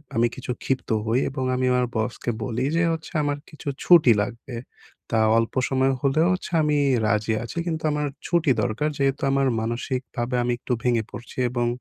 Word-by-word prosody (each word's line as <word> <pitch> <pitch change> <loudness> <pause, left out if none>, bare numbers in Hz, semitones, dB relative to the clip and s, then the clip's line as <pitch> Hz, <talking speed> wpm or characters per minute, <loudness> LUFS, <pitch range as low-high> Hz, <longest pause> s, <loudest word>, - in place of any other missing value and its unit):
আমি 120 +1 +4
কিছু 130 -1 -5
ক্ষিপ্ত 135 -1 -2 0.2
হই 115 +3 +2
এবং 130 -1 -4
আমি 130 0 0
আমার 125 -1 +2
বসকে 115 +2 -2
বলি 120 +3 -1
যে 170 - +3
হচ্ছে, 160 - -6
"আমার 145 0 0
কিছু 155 -2 -12 0.2
ছুটি 165 -8 +7
লাগবে। 120 +3 -5 0.6
তা 110 - +2 0.2
অল্প 115 0 0 0.2
সময় 135 0 +2
হলেও 150 +5 +3
হচ্ছে 185 - -5
আমি 150 -1 +2 0.3
রাজি 105 +1 +1
আছি। 120 - -8
কিন্তু 160 -1 -2
আমার 150 0 -1 0.2
ছুটি 170 -5 +2
দরকার।" 125 +6 0
যেহেতু 135 -1 0
আমার 135 0 +2
মানসিকভাবে 120 +1 -3
আমি 120 - 0
একটু 125 - -2
ভেঙে 120 -3 +2
পড়ছি 115 +4 -10
এবং 120 -1 0
130 Hz, 180 wpm, -24 LUFS, 120-145 Hz, 0.6 s, ছুটি